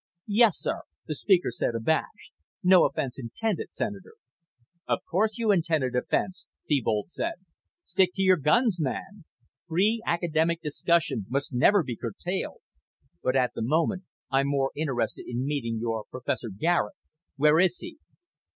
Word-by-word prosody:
"Yes, 215 -1 +4
sir," - - -2 0.2
the 155 - -3
speaker 180 - +2
said, 120 0 -2
abashed. 160 - -1 0.3
"No 185 0 +7
offense 135 -1 -2
intended, 175 - -3
Senator." 205 - -5 0.7
"Of - - -1
course 215 +6 +1
you 225 -3 +2
intended 160 -9 +1
offense," 185 +8 -1 0.2
Thebold 115 -3 0
said. 335 - -2 0.5
"Stick 185 0 +3
to 195 - 0
your 185 -1 +5
guns, 180 - +2
man. 185 +7 -4 0.4
Free 200 +7 +2
academic 170 -1 +1
discussion 150 - 0
must 140 +2 -2
never 180 +10 +4
be 125 -5 -5
curtailed. 175 - -4 0.6
But 130 +1 0
at 125 -2 +2
the - - -5
moment 165 - +1 0.3
I'm 135 +1 +2
more 140 -1 +1
interested 140 -5 -2
in 125 +2 -2
meeting 130 -6 -2
your 115 -1 -2
Professor 125 -2 -3
Garet. 105 - 0 0.4
Where 150 +2 +4
is 180 -1 +3
he?" 340 -2 -9
160 Hz, 140 wpm, -27 LUFS, 130-190 Hz, 0.7 s, No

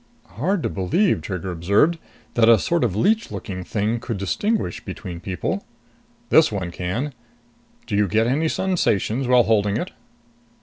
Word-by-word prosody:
"Hard 160 - -1
to - - 0
believe," 105 - +1
Trigger 95 -1 -4
observed, 100 - +2 0.3
"that 115 -1 +4
a 115 - +8
sort 170 - 0
of 105 -7 0
leech 215 - +2
looking 95 -4 -6
thing 110 +4 -1
could 115 -2 -4
distinguish 100 - -1
between 85 -2 -7
people." 95 0 -3 0.7
"This - - +5
one 95 -4 -3
can. 100 - -3 0.7
Do 110 - -3
you 105 0 +3
get 110 +4 +2
any 145 +7 +1
sensations 135 - 0
while 125 -1 +5
holding 105 -2 +2
it?" 180 - -4
110 Hz, 155 wpm, -22 LUFS, 95-145 Hz, 0.7 s, a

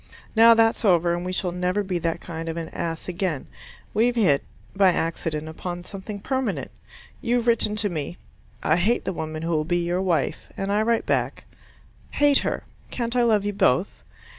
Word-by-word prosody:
Now 230 +1 +8
that's 225 +1 +3
over 175 -4 +4
and 175 0 -2
we 180 - -3
shall 185 -1 -1
never 180 +3 0
be 185 -2 -2
that 165 0 -2
kind 165 0 -6
of 165 - -4
an 165 -1 -4
ass 165 -1 -4
again. 180 -5 -2 0.5
We've 235 +3 +2
hit 180 -12 +3 0.3
by 195 -2 +5
accident 160 -2 -2
upon 175 +2 -6
something 200 +2 -7
permanent. 260 +3 -2 0.5
You've 240 0 +1
written 230 -3 +3
to 215 -1 +1
me, 170 -2 -4 0.5
"I 155 - +3
hate 215 +7 +1
the 190 - -1
woman 155 -1 -5
who 165 - -1
will 155 -2 +1
be 175 +2 0
your 175 +2 0
wife," 180 -4 0
and 195 0 -2
I 210 +1 +2
write 230 +1 +1
back, - - -1 0.7
"Hate 290 -1 +4
her. - - -2 0.3
Can't 235 -1 -3
I 245 - +4
love 215 -4 +3
you 205 - -1
both?" 190 -3 +1
185 Hz, 190 wpm, -24 LUFS, 170-220 Hz, 0.7 s, Now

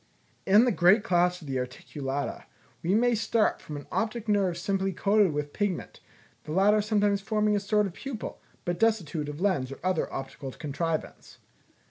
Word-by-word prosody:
In 205 +5 +6
the 250 - +3
great 190 +2 +5
class 180 -3 +2
of - - -10
the 130 -1 -1
Articulata, 135 +2 -4 0.4
we 180 +4 +1
may 240 +2 +3
start 225 0 +1
from 150 - -7
an 145 - -9
optic 230 0 -2
nerve 195 -4 +2
simply 195 +1 -1
coated 200 0 +3
with 145 0 -3
pigment, 205 -4 -2 0.5
the 150 - -6
latter 205 +4 +4
sometimes 205 -1 +1
forming 210 0 +1
a - - +2
sort 210 +1 +1
of 190 - -5
pupil, 265 -1 -6 0.2
but 175 0 -2
destitute 175 -9 +1
of 145 +1 -7
lens 175 -10 0
or 135 - -7
other 185 -3 0
optical 135 0 -6
contrivance. 160 +2 -4
190 Hz, 170 wpm, -28 LUFS, 155-210 Hz, 0.5 s, In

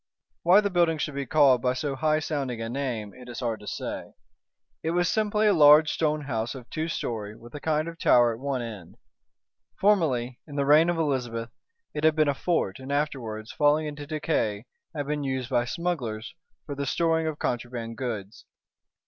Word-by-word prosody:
Why 185 +5 +6
the 200 -1 -1
building 170 -3 +3
should 150 0 -3
be 140 0 -4
called 140 -6 +5
by 125 +1 +1
so 140 +1 -2
high 155 +2 +2
sounding 140 -6 -3
a 115 0 -4
name, 120 -5 -3
it 125 -1 -12
is 120 - -6
hard 115 -3 -2
to 105 - -13
say. - - -5 0.7
It 165 +2 -1
was 175 -1 +3
simply 215 +1 +1
a 210 - +5
large 150 -1 +7
stone 155 -1 0
house 120 -3 -3
of 125 -2 -10
two 160 0 -2
story, 110 -9 -4
with 120 +1 -14
a 145 - -6
kind 155 +1 0
of 165 -1 -8
tower 120 -1 +5
at 115 - -9
one 135 -2 -2
end. 100 -5 -9 0.8
Formerly, 135 -12 +2
in 145 - -9
the 140 -1 +1
reign 155 +4 +6
of 175 - 0
Elizabeth, 120 -7 -1 0.4
it 150 - -4
had 160 -1 +5
been 155 -2 +3
a 145 - +3
fort, 140 - -1
and 130 +1 -7
afterwards, 125 -7 -2
falling 150 +1 +3
into 145 -1 -6
decay, 145 -9 -1 0.3
had 145 -2 -2
been 150 0 -2
used 130 -1 -3
by 120 -1 +2
smugglers 125 -9 -3 0.3
for 145 - -5
the 140 0 -3
storing 165 +1 +1
of 155 -2 -3
contraband 120 -3 -3
goods. 110 -5 -5
140 Hz, 195 wpm, -26 LUFS, 120-155 Hz, 0.8 s, large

